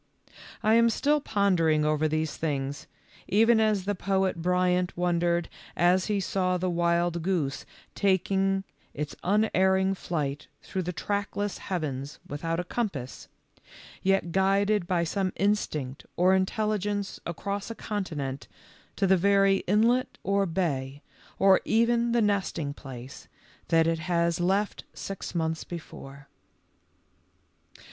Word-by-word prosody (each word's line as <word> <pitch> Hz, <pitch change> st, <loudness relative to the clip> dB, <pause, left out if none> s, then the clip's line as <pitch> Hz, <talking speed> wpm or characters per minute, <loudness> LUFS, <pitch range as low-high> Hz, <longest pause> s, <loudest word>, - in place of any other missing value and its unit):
I 215 Hz, -, +4 dB
am 230 Hz, 0 st, +5 dB
still 290 Hz, +6 st, +1 dB
pondering 175 Hz, -, +2 dB
over 155 Hz, 0 st, +2 dB
these 155 Hz, 0 st, -1 dB
things, 140 Hz, -3 st, -3 dB, 0.4 s
even 225 Hz, +3 st, +4 dB
as 215 Hz, -4 st, +2 dB
the 205 Hz, -, 0 dB
poet 190 Hz, -2 st, 0 dB
Bryant 180 Hz, 0 st, +1 dB
wondered 175 Hz, -1 st, +1 dB, 0.3 s
as 180 Hz, +2 st, +3 dB
he 210 Hz, -1 st, +1 dB
saw 185 Hz, -1 st, 0 dB
the 180 Hz, 0 st, -1 dB
wild 170 Hz, 0 st, +1 dB
goose 160 Hz, -6 st, -1 dB, 0.3 s
taking 195 Hz, 0 st, +1 dB, 0.3 s
its 150 Hz, 0 st, -4 dB
unerring 190 Hz, -1 st, +2 dB
flight 145 Hz, -6 st, -3 dB, 0.2 s
through 190 Hz, -, -3 dB
the 180 Hz, 0 st, -3 dB
trackless 205 Hz, +2 st, -3 dB
heavens 145 Hz, -6 st, -4 dB
without 165 Hz, +4 st, -3 dB
a -, -, -1 dB
compass, 175 Hz, -, -4 dB, 0.7 s
yet 195 Hz, -3 st, +1 dB
guided 195 Hz, +1 st, +2 dB
by 175 Hz, -2 st, +1 dB
some 185 Hz, +2 st, -1 dB
instinct 155 Hz, -10 st, -1 dB
or 185 Hz, +2 st, +4 dB
intelligence 205 Hz, +1 st, -1 dB
across 200 Hz, +5 st, -4 dB
a 230 Hz, -, -5 dB
continent 150 Hz, -12 st, -4 dB, 0.5 s
to 200 Hz, -, +1 dB
the 190 Hz, 0 st, +4 dB
very 195 Hz, +1 st, +4 dB
inlet 230 Hz, +6 st, +2 dB
or 200 Hz, 0 st, +1 dB
bay, 145 Hz, -6 st, -2 dB, 0.3 s
or 195 Hz, -1 st, +5 dB
even 235 Hz, +1 st, +2 dB
the 235 Hz, -1 st, +3 dB
nesting 190 Hz, -8 st, -1 dB
place, 130 Hz, -3 st, -10 dB, 0.4 s
that 165 Hz, -1 st, +4 dB
it 165 Hz, 0 st, +1 dB
has 170 Hz, 0 st, 0 dB
left 195 Hz, +4 st, 0 dB
six 195 Hz, -2 st, -6 dB
months 160 Hz, -1 st, -1 dB
before. 140 Hz, -4 st, -10 dB
185 Hz, 125 wpm, -27 LUFS, 165-200 Hz, 0.7 s, am